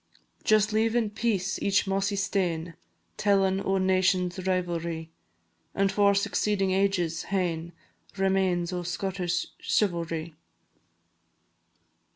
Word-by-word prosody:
Just 215 0 +3
leave 225 +1 +2
in 225 -3 +1
peace 205 -4 -1
each 200 +1 +2
mossy 195 +1 0
stane 175 -4 -1 0.4
Tellin' 195 -1 +2
o' 195 0 +1
nations' 185 -1 +1
rivalry, 170 -3 -2 0.6
An' 195 0 +2
for 200 +1 +3
succeeding 200 -1 +1
ages 185 -4 0
hain 170 -3 -2 0.5
Remains 190 -2 +1
o' 180 - -2
Scottish 180 0 -2
chivalry. 170 -4 -1
190 Hz, 100 wpm, -27 LUFS, 175-200 Hz, 0.6 s, Just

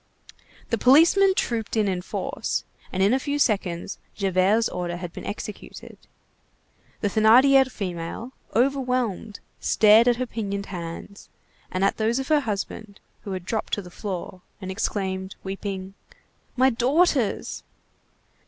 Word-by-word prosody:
The 230 - +1
policemen 340 - +6
trooped 230 - -1
in 215 -2 +2
in 185 -2 -1
force, 180 - -3 0.3
and 190 0 0
in 200 +4 +4
a 265 - +2
few 285 +2 -2
seconds 200 -8 -1 0.2
Javert's 195 +3 +2
order 175 -1 -4
had 175 -1 -7
been - - -8
executed. 210 0 -7 1.1
The 205 - +1
Thénardier 255 +6 +5
female, 185 +4 -5 0.2
overwhelmed, 250 -5 0 0.2
stared 220 +2 +5
at 245 - +5
her 255 +2 -2
pinioned 200 -4 -4
hands, 175 +2 -8 0.4
and 185 +1 -2
at - - +1
those 225 +2 +1
of 270 +1 -3
her 305 -1 +5
husband, 215 -3 -5 0.3
who 200 - -4
had 185 -2 -5
dropped 220 +3 -3
to 205 - +1
the 180 - -12
floor, 185 -2 -6 0.2
and 190 -1 -6
exclaimed, 190 -2 -3
weeping:— 195 0 -5 0.6
"My 260 +1 +5
daughters!" 260 - +1
210 Hz, 135 wpm, -24 LUFS, 190-250 Hz, 1.1 s, policemen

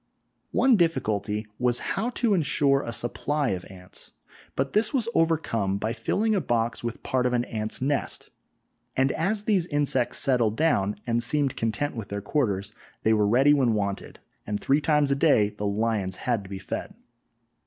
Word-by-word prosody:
One 260 -4 +4
difficulty 110 - 0
was 125 -1 +2 0.2
how 220 +5 -1
to 240 -3 0
ensure 140 -5 +2
a 115 - -5
supply 140 +5 -1
of 90 -2 -3
ants, 90 -1 -11 0.5
but 135 0 -1
this 215 +1 +2
was 235 -4 0
overcome 115 -12 +1
by 110 +3 -2
filling 210 - 0
a 195 - +1
box 120 -4 -1
with 120 0 -5
part 125 -1 +1
of 125 - -1
an 120 0 +1
ants' 110 +2 -4
nest, 140 +1 -2 0.7
and 135 +1 +3
as 200 +6 0
these 195 -6 +1
insects 145 -5 0
settled 120 -6 +2
down 105 -11 +2
and 120 0 0
seemed 140 +2 +1
content 115 +6 -2
with 110 -4 -6
their 100 - -3
quarters, 105 -4 -1 0.3
they 110 - +4
were 105 -1 +3
ready 135 +7 +5
when 130 -6 +2
wanted, 100 -1 -3 0.3
and 105 0 -2
three 140 +3 +2
times 150 -2 +2
a - - +3
day 140 -8 +3
the 105 0 -4
lions 100 -2 -1
had 115 0 -1
to - - -11
be 100 - -5
fed! 95 - -6
125 Hz, 175 wpm, -26 LUFS, 105-150 Hz, 0.7 s, ready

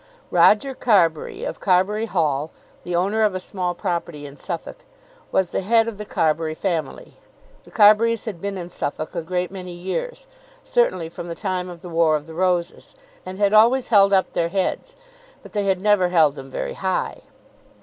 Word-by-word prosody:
Roger 270 +6 +4
Carbury, 180 -11 +1
of - - -5
Carbury 205 +4 +1
Hall, 155 -6 0 0.3
the 175 - -3
owner 200 +5 +1
of 210 -3 +2
a - - -2
small 180 -1 -3
property 170 -5 -4
in 140 -1 -10
Suffolk, 170 - -6 0.5
was 185 -2 +1
the - - -1
head 225 +3 +3
of 220 -3 -6
the 210 - -5
Carbury 160 -3 0
family. 165 -6 -4 0.5
The - - -15
Carburys 220 +2 +4
had 200 -7 -6
been 200 -1 -3
in 175 -1 -6
Suffolk 155 -2 -4
a 170 - -3
great 180 +2 -3
many 185 -2 -7
years, - - -5 0.4
certainly 185 - +1
from 170 +1 -8
the 170 - -5
time 185 -2 -3
of 175 -2 -10
the - - -7
War 165 -2 +3
of 150 -1 -4
the 160 - -11
Roses, 175 0 -1 0.3
and 185 0 -6
had 205 0 +2
always 235 +4 +5
held 200 -3 +5
up 190 -1 +2
their 170 0 0
heads. 195 - -2 0.5
But - - -14
they 205 -1 -1
had 190 -1 +1
never 200 -2 +3
held 160 -5 +4
them 135 -2 -10
very - - -4
high. 190 -1 -2
185 Hz, 185 wpm, -22 LUFS, 170-205 Hz, 0.5 s, always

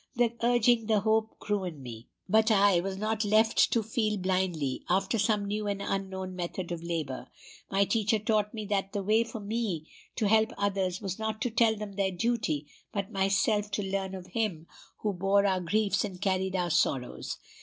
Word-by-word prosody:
The 240 -1 +2
urging, 240 -1 +3
the 215 -2 +3
hope, 220 +1 +1
grew 205 -2 -1
in 160 -7 -6
me. 115 -2 -9 0.2
But 220 +3 +4
I 200 -4 +5
was 190 +2 -3
not 215 +1 -1
left 215 +2 +4
to 230 - +2
feel 215 -1 0
blindly 185 -7 -1
after 195 +5 +1
some 205 0 +2
new 210 +1 -2
and 200 -1 -1
unknown 190 -2 -3
method 175 0 -4
of 170 -1 -3
labor. 160 -6 -4 0.4
My 195 +1 +3
teacher 220 0 +2
taught 210 0 +1
me 215 -3 -5
that 195 -1 -1
the 200 -2 -2
way 215 +3 +3
for 230 -1 -7
me 205 -6 -2 0.3
to 215 - +1
help 220 +1 +3
others 195 -2 0
was 195 -1 -4
not 220 0 -2
to 245 - -1
tell 225 0 +3
them 205 -2 -7
their 195 -1 +2
duty, 185 -7 -1 0.3
but 200 0 -3
myself 195 +1 +1
to 205 0 -2
learn 195 0 -2
of 185 -1 -8
Him 185 -4 -2 0.4
who 210 -2 0
bore 195 +2 +2
our 190 -2 +2
griefs 205 +4 +1
and 190 -4 -5
carried 190 -1 0
our 175 -2 0
sorrows. 130 -4 0
200 Hz, 190 wpm, -29 LUFS, 185-220 Hz, 0.4 s, I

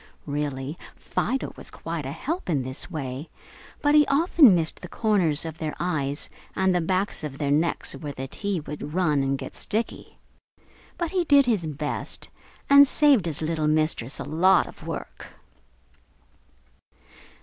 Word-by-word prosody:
Really, 145 +1 -3 0.2
Fido 265 +4 -2
was - - -9
quite - - -5
a - - -4
help 335 - -4
in 145 -6 +1
this 130 +1 -3
way, 135 0 -5 0.5
but 290 0 +4
he 300 -1 +6
often 285 - +6
missed 165 -2 0
the 180 - -7
corners 175 -9 +1
of 160 0 -7
their 155 -2 -3
eyes 145 -5 -2 0.3
and 190 -1 +2
the 180 - +2
backs 185 +2 -1
of 140 -3 -5
their 140 -1 -1
necks 160 +4 +1
where 150 -3 -6
the 135 -1 -6
"tea" 200 +5 -3
would 150 +1 -7
run 155 -6 +2
and 135 0 0
get - - -8
sticky. 225 +2 -3 0.8
But 340 -2 -2
he 370 -2 +1
did 285 -4 +5
his 210 -9 +1
best 150 0 -4 0.4
and 280 0 +8
saved 275 - +4
his 160 -1 -1
little 155 -1 0
Mistress 155 -4 0
a - - -3
lot 180 +4 +4
of - - -12
work. - - -7
165 Hz, 160 wpm, -25 LUFS, 145-210 Hz, 0.8 s, and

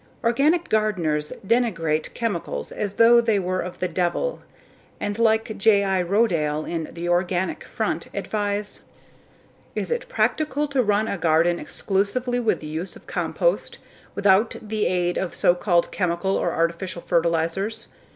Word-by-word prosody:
Organic 295 +9 +2
gardeners 170 -9 0
denigrate 180 -10 +1
chemicals 220 -8 -3
as 205 -2 -3
though 235 +2 +6
they 225 -3 +2
were 185 -1 -1
of 180 0 -6
the 185 - -1
devil 180 - -1 0.6
and 205 +1 -3
like 220 -1 +2
J.I. 200 -3 +3
Rodale 170 -6 +1
in 165 -2 -3
The 170 +1 -5
Organic 175 +1 0
Front, - - -2
advise: 205 -1 -3 0.9
"Is - - -2
it - - -2
practical 300 - 0
to 275 -2 +2
run 210 -1 +1
a 200 - -3
garden 170 +1 +3
exclusively 245 +6 -1
with 225 -3 0
the - - -8
use 160 +5 -5
of - - -15
compost, - - -1 0.4
without 200 +3 +3
the 215 -1 -1
aid 175 -1 0
of 190 - -3
so 175 - +4
called 175 -1 +1
chemical 180 +1 0
or 175 - 0
artificial 170 +2 -2
fertilizers? 170 +6 0
195 Hz, 140 wpm, -23 LUFS, 175-225 Hz, 0.9 s, though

